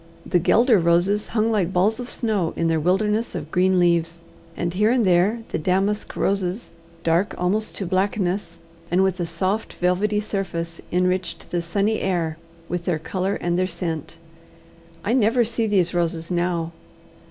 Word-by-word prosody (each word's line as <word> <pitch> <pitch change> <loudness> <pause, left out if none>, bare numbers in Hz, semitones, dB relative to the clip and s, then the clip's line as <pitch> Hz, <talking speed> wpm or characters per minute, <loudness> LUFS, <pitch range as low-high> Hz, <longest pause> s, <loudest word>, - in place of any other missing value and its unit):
The 180 - +2
guelder 230 +5 +4
roses 175 +5 +2
hung 225 0 +1
like 190 -5 +1
balls 200 +5 +2
of 245 0 -6
snow 210 -8 -1
in 165 - 0
their 160 -1 +2
wilderness 210 +6 +1
of 155 -2 -6
green 185 +1 +3
leaves; 170 -1 +2 0.4
and 175 0 -2
here 210 +4 +3
and 240 -2 +3
there 190 +6 +3
the - - -2
damask 195 +5 0
roses, 195 +2 -1 0.3
dark 170 +5 +1
almost 205 +5 -1
to 195 - -3
blackness, 190 +1 -1 0.3
and 185 +2 +3
with 190 -1 0
a 175 - -1
soft 185 +6 -2
velvety 195 +4 +1
surface, 175 -5 -3
enriched 180 +1 -1
the 175 - 0
sunny 200 +6 0
air 165 -4 -1 0.3
with 175 -1 -3
their 175 -3 +1
colour 185 +5 -2
and 175 +1 -1
their 185 - +1
scent. 170 -3 -4 0.9
I 220 - +1
never 240 0 +3
see 230 0 -1
these 185 -4 +2
roses 170 -1 -1
now. 175 -1 0
185 Hz, 165 wpm, -23 LUFS, 170-210 Hz, 0.9 s, guelder